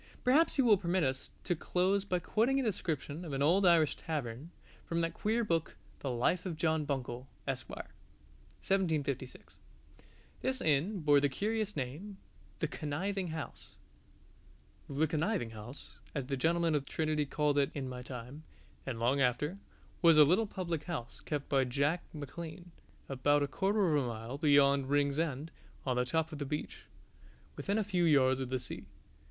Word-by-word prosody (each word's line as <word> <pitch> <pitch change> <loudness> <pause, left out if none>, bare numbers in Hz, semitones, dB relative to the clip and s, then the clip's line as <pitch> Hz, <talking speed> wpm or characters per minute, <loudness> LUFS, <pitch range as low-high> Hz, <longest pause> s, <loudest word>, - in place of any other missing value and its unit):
Perhaps 290 +7 +4
you 265 - +4
will 210 -5 +6
permit 180 -1 +1
us 130 -1 -1
to 175 - 0
close 185 +4 +1
by 185 -2 0
quoting 225 +9 +1
a - - 0
description 165 - -2
of 155 -5 -6
an 135 +1 0
old 180 +6 +4
Irish 165 -4 +5
tavern, 140 -2 -4 0.3
from 170 - -2
that 165 0 -1
queer 225 +5 0
book 165 -6 -1 0.2
"The 140 - -3
Life 125 +9 +1
of 165 -4 -4
John 160 -1 +1
Buncle, 130 -3 -3 0.2
Esq." - - -3
(1756). 140 - -4 0.8
This 260 0 0
inn 165 - +1
bore 145 -1 +5
the 140 0 +2
curious 210 +7 -1
name 155 +10 -5 0.4
The - - -1
Conniving 185 +6 -2
House: 160 -2 -7 1.1
The 145 +3 +2
Conniving 160 - -1
House 110 +5 -10 0.2
(as 140 -3 -1
the 135 +1 -2
gentlemen 165 +4 +2
of 145 -2 0
Trinity 155 -2 0
called 145 0 +1
it 140 - +2
in 135 -3 -3
my 125 -1 -6
time, 125 +3 -8 0.5
and 120 -3 -3
long 130 +4 +2
after) 150 +9 +1 0.4
was 165 -3 +7
a 155 - +10
little 185 +9 +3
public 170 -6 -3
house, 155 -10 -5
kept 145 -2 -3
by 135 -2 +3
Jack 140 +7 +1
Macklean, 165 +4 -8 0.4
about 145 +2 +2
a - - 0
quarter 195 -1 +2
of 145 - +3
a - - -2
mile 115 +4 -5
beyond 140 -2 +4
Rings 145 0 +2
end, 155 0 -2 0.3
on 130 -2 +1
the 125 - +2
top 160 +4 0
of 150 - -6
the 145 - -2
beach, 150 +2 -5 0.7
within 200 +1 -1
a 220 - +2
few 185 -4 +1
yards 130 -4 +4
of 130 -2 -3
the 130 - 0
sea. - - -7
150 Hz, 170 wpm, -33 LUFS, 135-180 Hz, 1.1 s, a